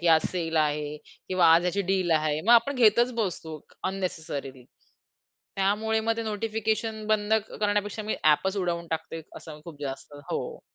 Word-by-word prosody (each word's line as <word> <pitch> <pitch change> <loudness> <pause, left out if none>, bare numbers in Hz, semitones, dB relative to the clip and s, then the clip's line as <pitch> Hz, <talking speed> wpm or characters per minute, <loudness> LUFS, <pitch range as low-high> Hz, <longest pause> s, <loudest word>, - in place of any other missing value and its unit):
की 175 - -2
आज 160 -1 +6
सेल 165 -3 -2
आहे 150 -1 0 0.3
किंवा 185 -2 +3
आज 170 - +4
ह्याची 180 +3 0
डील 185 -3 +1
आहे. 155 -1 +2
मग 225 +8 +4
आपण 240 +4 +5
घेतच 240 +1 +4
बसतो 165 -8 -3 0.2
अननेसेसरीली. 155 -9 -4 0.9
त्यामुळे 215 +3 +1
मग 225 +1 0
ते 230 - -2
नोटिफिकेशन 220 0 -2
बंद 215 0 +1 0.3
करण्यापेक्षा 205 0 0
मी 215 - -2
ॲपच 190 +6 +3
उडवून 175 -2 -1
टाकते. 160 0 -4
असं 150 -1 -10
खूप 155 -4 -11
जास्त 135 +1 -6 0.2
हो. - - -3
185 Hz, 155 wpm, -27 LUFS, 160-215 Hz, 0.9 s, आज